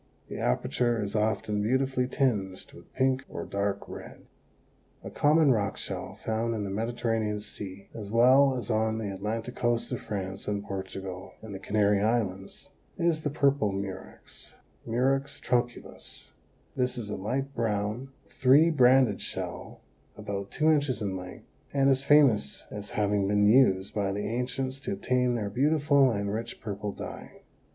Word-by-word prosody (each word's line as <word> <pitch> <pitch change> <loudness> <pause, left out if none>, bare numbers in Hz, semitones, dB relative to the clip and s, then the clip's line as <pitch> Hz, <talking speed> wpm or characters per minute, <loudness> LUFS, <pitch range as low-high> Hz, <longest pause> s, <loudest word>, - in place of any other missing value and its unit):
The - - -6
aperature 115 - 0
is 105 0 -3
often 105 -1 0
beautifully 130 +3 +1
tinged 105 -9 -1
with - - -15
pink 130 0 +1
or - - -5
dark 100 0 -2
red. - - -10 0.8
A - - -7
common 150 -1 +4
rock 100 -5 0
shell - - -5
found 115 +1 0
in 105 - -2
the 100 - -4
Mediterranean 115 -1 -1
Sea 100 -2 -8
as 105 -3 -7
well 130 +4 +5
as 120 - -3
on 110 0 +1
the 105 -3 -3
Atlantic 110 +5 -4
coast 120 0 0
of 125 - -3
France 95 -2 -5
and 100 -1 -2
Portugal 95 -1 -6
and 110 -2 -8
the 95 - -6
Canary 100 0 +2
Islands, 100 -4 -2 0.3
is 170 -2 +1
the 150 - -1
Purple 140 -7 +2
Murex 95 -1 -7 0.3
(Murex 135 +4 0
trunculus). 120 -1 -3 0.4
This 125 -1 0
is 105 -3 -5
a - - -2
light 135 +7 -3
brown, 110 +2 -2 0.2
three 140 +6 +4
banded 130 -6 +4
shell - - -5 0.4
about 100 -2 -5
two 155 +1 +2
inches 140 -7 +1
in 95 -2 -2
length 90 -1 -8 0.3
and 135 0 +4
is 135 0 +1
famous 135 - +4
as 105 0 -6
having 100 -1 +1
been 105 0 +3
used 105 -4 +4
by 100 -2 0
the 100 +1 -3
ancients 125 +3 -2
to 195 +9 -4
obtain 125 -10 +1
their 105 -3 -2
beautiful 140 +2 +3
and 100 -3 -2
rich 115 +2 -5
purple 105 -1 -4
dye. - - -9
110 Hz, 155 wpm, -28 LUFS, 100-130 Hz, 0.8 s, well